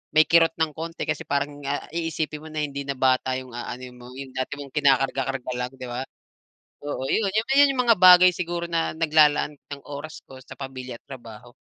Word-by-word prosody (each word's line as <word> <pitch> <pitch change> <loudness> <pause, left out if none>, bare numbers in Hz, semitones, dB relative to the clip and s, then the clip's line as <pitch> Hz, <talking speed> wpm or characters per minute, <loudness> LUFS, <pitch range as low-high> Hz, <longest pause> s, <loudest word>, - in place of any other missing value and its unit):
may 155 - +8
kirot 165 -1 +4
ng 160 -1 0
konti, 165 +1 -5
kasi - - -2
parang 145 0 -2
ah 145 +1 -2
iisipin 160 -2 -3
mo 160 - -9
na 155 0 -3
hindi 140 -1 -4
na 140 - -2
bata 130 0 +2
yung 130 -1 -11
aanuhin 125 +1 -7
mo, 125 0 -12
yung 135 -1 -8
dati 130 +2 -3
mong 140 -1 -10
kinakarga-karga 135 -2 +1
lang, 125 0 -3
'di 130 -1 -8
ba. 120 +1 -4 0.8
Oo, 140 -2 -4
yun 220 - +1
yun 270 +6 +4
yung 255 - +1
mga 230 - +6
bagay 180 0 +9
siguro 175 -1 -3
na 165 -2 -1
naglalaan 150 -2 +3
ng 140 0 -11
oras 145 +2 -8
ko 130 - -13
sa - - -12
pamilya 130 -2 -7
at - - -76
trabaho. 120 -3 -11
145 Hz, 200 wpm, -24 LUFS, 130-165 Hz, 0.8 s, bagay